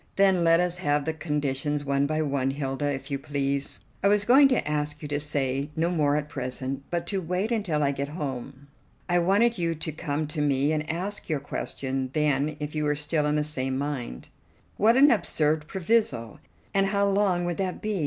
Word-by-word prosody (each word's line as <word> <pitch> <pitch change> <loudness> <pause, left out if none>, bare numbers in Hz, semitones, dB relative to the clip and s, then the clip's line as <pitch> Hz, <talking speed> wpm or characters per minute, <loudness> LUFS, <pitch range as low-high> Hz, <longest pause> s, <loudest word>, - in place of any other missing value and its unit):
"Then 190 -3 +4
let 165 0 +5
us 180 0 0
have 145 -4 +1
the 160 - -1
conditions 145 -2 -1
one 140 0 +1
by 155 +1 0
one, 140 -2 0
Hilda, 140 +1 -2
if 135 0 -6
you 140 - -1
please." 140 0 -2 0.2
"I - - +5
was 205 0 +3
going 270 +5 +7
to 255 - 0
ask 150 0 -2
you - - -4
to 145 0 0
say 140 -1 -1
no 170 +2 +1
more 150 -4 +2
at 150 0 -1
present, 130 -1 -4
but 170 -1 -2
to 195 -2 -1
wait 180 +6 -1
until 185 -10 0
I 140 - +2
get 140 0 -3
home. 140 -3 -6 0.4
I 175 -1 +3
wanted 205 +5 +3
you 165 -1 0
to 160 +1 -4
come 150 0 -2
to 150 0 -3
me, 140 0 +2
and 155 0 -2
ask 190 +6 -2
your 155 -3 0
question 135 -1 -3
then 150 0 +1
if 150 0 -4
you 155 -1 -1
were 150 0 +1
still 150 +1 -1
in 150 - +1
the 150 - +1
same 130 -3 -2
mind." 135 - -4 0.5
"What 225 +4 +4
an 285 +1 +7
absurd 155 -6 +1
proviso! 175 - 0 0.3
And 195 0 +3
how 200 0 +2
long 195 -3 +2
would 175 -1 -2
that 185 -2 -2
be? 210 -3 -2
150 Hz, 205 wpm, -26 LUFS, 140-180 Hz, 0.5 s, going